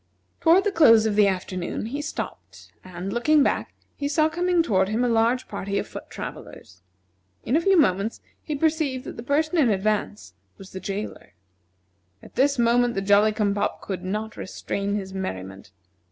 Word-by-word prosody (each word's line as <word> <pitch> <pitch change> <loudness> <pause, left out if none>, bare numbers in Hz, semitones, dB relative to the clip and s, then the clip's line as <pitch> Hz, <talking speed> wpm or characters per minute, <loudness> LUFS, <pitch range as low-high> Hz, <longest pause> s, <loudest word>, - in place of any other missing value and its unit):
Toward 345 +4 +5
the 410 - 0
close 230 - +6
of 215 -2 0
the 210 -1 +5
afternoon 185 0 -3
he 280 +6 -4
stopped, 305 - -7
and, 185 +1 -6
looking 295 +5 +3
back, - - -1 0.2
he 285 - -3
saw 310 +2 +2
coming 350 +1 +1
toward 190 - +1
him 225 +3 0
a - - +2
large 235 +2 +1
party 200 0 -4
of - - -2
foot - - -9
travellers. 90 0 -9 0.6
In 255 - 0
a 325 - +3
few 385 +2 +4
moments, 200 -4 +1 0.2
he 305 - -4
perceived 300 -4 0
that - - -7
the - - -7
person 310 +7 0
in 265 -6 +4
advance 190 - -1 0.2
was 195 - -13
the 190 - -6
jailer. 195 - -6 0.9
At - - -14
this 280 +2 +2
the 240 -3 +2
Jolly 205 +2 +5
cum 210 -1 0
pop 200 - -2
could 190 -2 -5
not 215 +4 -4
restrain 200 +2 -3
his 190 -2 -5
merriment. 95 - -6
220 Hz, 175 wpm, -24 LUFS, 195-285 Hz, 0.9 s, close